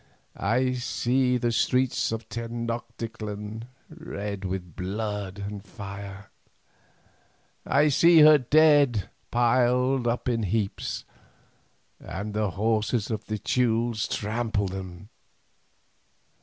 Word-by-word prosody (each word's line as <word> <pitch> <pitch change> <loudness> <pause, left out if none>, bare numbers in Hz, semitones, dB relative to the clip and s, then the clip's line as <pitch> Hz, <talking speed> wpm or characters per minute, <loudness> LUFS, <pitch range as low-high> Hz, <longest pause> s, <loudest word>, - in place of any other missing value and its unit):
I 125 +5 +1
see 125 +1 +1
the 120 -1 0
streets 130 +1 +1
of 115 0 -4
Tenoctitlan 115 -2 -5 0.2
red 105 - -6
with 90 -3 -5
blood 100 0 -4
and 100 0 -6
fire, 100 0 -9 1.4
I 150 +2 +4
see 165 +3 +6
her 150 0 +8
dead 145 - +4 0.2
piled 125 +1 +2
up 120 +2 -1
in 120 -2 +1
heaps, 105 0 -2 0.9
and 105 +3 -6
the 105 -1 0
horses 110 +3 0
of 110 -1 -3
the 110 - -2
Teules 115 -1 0
trample 110 -1 -1
them. 95 +1 -7
115 Hz, 100 wpm, -26 LUFS, 100-125 Hz, 1.4 s, her